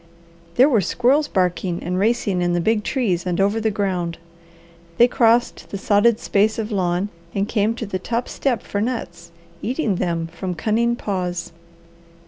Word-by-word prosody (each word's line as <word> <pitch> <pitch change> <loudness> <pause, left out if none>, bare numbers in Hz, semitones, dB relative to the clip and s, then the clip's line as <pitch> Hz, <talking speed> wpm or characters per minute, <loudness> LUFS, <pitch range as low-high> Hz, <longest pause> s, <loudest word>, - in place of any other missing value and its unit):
There 255 +3 +6
were 235 -8 +3
squirrels 265 - +2
barking 180 -3 -1
and 180 +1 -1
racing 205 -3 +1
in 175 0 +1
the 175 - +1
big 215 +4 +1
trees 200 -11 0
and 175 0 -1
over 200 +3 +2
the 220 - +2
ground. 185 -5 -2 0.8
They 240 - +7
crossed 240 0 +2
the 200 - -4
sodded 210 +3 +3
space 210 +2 +1
of 225 0 -3
lawn 185 0 0 0.3
and 200 +1 0
came 220 +1 +1
to 230 - -4
the 190 -2 -3
top 235 +5 -2
step 250 -6 -1
for 200 - -3
nuts, 175 -8 -4 0.3
eating 240 - -1
them 170 -2 -1
from 180 +2 -4
cunning 230 +7 +1
paws. 180 -6 -3
205 Hz, 165 wpm, -21 LUFS, 180-230 Hz, 0.8 s, They